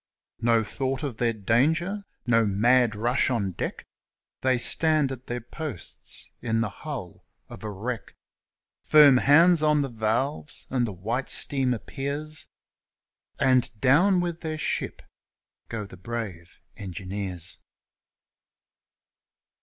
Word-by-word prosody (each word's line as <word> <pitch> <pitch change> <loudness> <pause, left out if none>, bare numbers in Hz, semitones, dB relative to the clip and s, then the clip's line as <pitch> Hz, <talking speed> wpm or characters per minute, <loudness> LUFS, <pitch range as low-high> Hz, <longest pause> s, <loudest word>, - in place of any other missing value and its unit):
No 115 -1 +3
thought 130 +4 -3
of 135 -6 -4
their 120 -1 +1
danger! 160 - +1 0.2
No 115 -2 +4
mad 115 +3 +3
rush 120 +5 +1
on 105 -7 -1
deck! - - -5 0.6
They 130 -1 +2
stand 150 +3 +3
at 130 -1 -8
their 120 0 -3
posts 125 - -6
in 115 -1 0
the 115 - -1
hull 135 - -8 0.3
of - - -10
a 110 - -4
wreck, 110 +4 -5 0.7
Firm 145 -4 +7
hands 165 +5 +5
on 150 -1 +3
the 135 - -3
valves; 120 +7 +1
and 125 -2 +1
the - - -4
white 110 +8 -3
steam 135 -3 +2
appears; 140 +5 -4 0.9
And 130 -1 +3
down 175 - +4
with 170 -1 -3
their 155 -1 -3
ship - - -3 0.7
go 110 -2 -4
the 95 -2 -13
brave 95 -4 -6 0.2
engineers! 95 -2 -6
125 Hz, 120 wpm, -26 LUFS, 110-145 Hz, 0.9 s, Firm